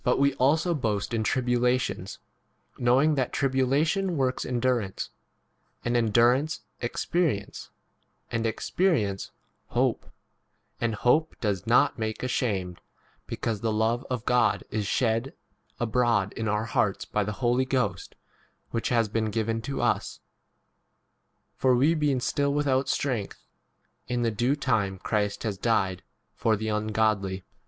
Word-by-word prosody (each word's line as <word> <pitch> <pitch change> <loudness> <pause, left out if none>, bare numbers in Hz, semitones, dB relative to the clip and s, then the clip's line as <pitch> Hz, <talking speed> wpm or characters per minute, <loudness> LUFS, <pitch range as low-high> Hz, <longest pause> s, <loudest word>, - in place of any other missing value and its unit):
ROMANS 140 +3 +3
V. 175 - +1
boast 110 -7 -1
in 110 -1 0
tribulations, 125 +1 0 0.6
knowing 130 +6 +4
that 130 -4 +1
4 - - -25
tribulation 145 +7 +1
works 130 -1 0
endurance; 120 -5 -1 0.7
and 120 0 0
endurance, 120 +6 +3 0.2
experience; 120 - -1 0.6
and 115 0 -1
expe 110 - -3
5 185 0 +3
rience, 100 -8 -1 0.4
hope; - - 0 0.7
and 115 -2 0
hope 155 +9 +2
does 100 -5 -2
not - - +3
make 110 +1 -3
ashamed, 100 -9 -1 0.5
because 110 -3 -3
the 115 - 0
love 110 +3 +1
of 125 -2 -3
God 125 0 +2
is 105 -2 -1
shed 115 - 0 0.4
abroad 115 -4 +1
in 110 - -3
our 105 +1 0
hearts 115 -4 0
by 105 - -1
the 105 +1 -3
Holy 125 +2 +1
Ghost 130 -1 -2 0.6
which 115 - -1
has 115 -3 +2
been 110 +1 -1
6 105 - -5
given 115 0 0
to 135 +5 -3
us: - - 0 1.4
for 130 -1 +3
we 140 +7 +4
being 150 -5 +1
still 140 +2 0
without 140 -2 +1
strength, 125 -8 -2 0.6
in 120 0 -1
[the] 115 - +1
due 120 +6 +1
time 110 -9 0
Christ 105 +1 -1
has 105 -4 -3
died 95 -6 +1
h - - -30 0.3
for 110 - +1
[the] 110 +1 -3
ungodly. 105 -3 0
120 Hz, 140 wpm, -27 LUFS, 110-130 Hz, 1.4 s, knowing